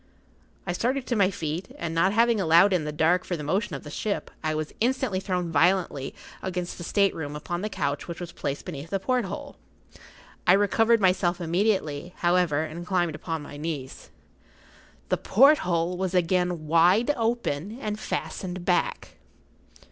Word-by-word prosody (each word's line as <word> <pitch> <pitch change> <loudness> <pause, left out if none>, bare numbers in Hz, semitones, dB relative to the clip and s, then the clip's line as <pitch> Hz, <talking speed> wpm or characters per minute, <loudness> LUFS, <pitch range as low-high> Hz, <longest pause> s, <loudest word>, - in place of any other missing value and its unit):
I 175 - -1
started 255 +7 -1
to 240 - -1
my 200 -3 +4
feet, 165 -1 -5
and 170 -1 -4
not 170 +4 +3
having 230 0 +3
allowed 170 +3 +5
in 170 -4 +1
the 150 - -2
dark 170 +4 +2
for 175 - -3
the 150 - -6
motion 185 +2 -1
of 135 - -7
the 150 - -9
ship, 205 +6 -3
I 155 0 0
was 155 -1 -4
instantly 250 -4 0
thrown 180 -3 -2
violently 165 -3 +1 0.3
across 180 -1 -3
the 175 - -9
state 200 +2 +2
room 150 -2 -5
upon 175 +4 -4
the 215 - -2
couch 140 -7 -2
which 170 -1 -6
was 175 -1 -6
placed 140 -3 -4
beneath 160 -3 -7
the 195 - -1
porthole. 245 -1 -2 0.9
I 180 - +8
recovered 225 +3 +3
myself 180 -1 +2
immediately, 175 -2 -1
however, 175 -4 +2
and 160 +2 -6
climbed 175 -3 0
upon 160 0 -4
my 145 - -9
knees. 145 -4 -6 1.0
The - - +2
porthole 180 - +3
was 185 0 -2
again 180 -2 +1
wide 175 - +4
open 225 -5 -2
and 210 -4 -3
fastened 185 -4 -4
back! 180 - 0
180 Hz, 165 wpm, -26 LUFS, 160-200 Hz, 1.0 s, I